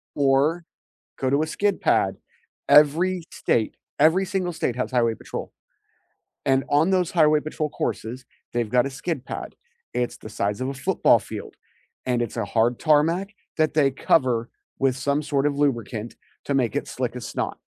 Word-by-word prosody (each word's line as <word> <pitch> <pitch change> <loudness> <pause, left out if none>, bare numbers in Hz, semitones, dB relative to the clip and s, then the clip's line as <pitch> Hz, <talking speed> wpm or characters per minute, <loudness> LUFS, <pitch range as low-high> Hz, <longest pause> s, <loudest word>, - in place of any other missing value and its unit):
Or, 145 +5 +2 0.6
go 130 - 0
to 140 +3 +2
a - - -3
skid 200 +4 0
pad. - - +2 0.5
Every 165 +5 +5
state 110 -2 0 0.2
every 165 +6 +4
single 185 -2 -2
state 130 -7 -2
has 125 - -2
highway 120 -3 +2
patrol, - - -7 0.9
and 135 0 +2
on 155 +6 +3
those 180 -3 +1
highway 155 -3 +4
patrol 155 0 -3
courses, 125 -2 -4 0.3
they've 120 -2 -1
got 125 +2 +3
a 135 - -3
skid 140 0 -4
pad, - - -6 0.4
it's 125 -1 -2
the 110 - -10
size 105 +2 -2
of 130 - -2
a 135 - -3
football 130 - +3
field, - - -8 0.5
and 125 -1 0
it's 120 -1 -3
a 115 - -1
hard 115 +4 +1
tarmac 165 +5 +2 0.3
that 155 -1 +2
they 145 -3 +3
cover 125 -4 +1 0.3
with 135 -1 +1
some 140 +2 0
sort 140 -1 0
of 140 -1 0
lubricant 120 -5 -1 0.3
to 140 - -2
make 125 -5 +1
it - - -1
slick - - -3
as - - -6
snot. - - -3
140 Hz, 175 wpm, -24 LUFS, 125-155 Hz, 0.9 s, Every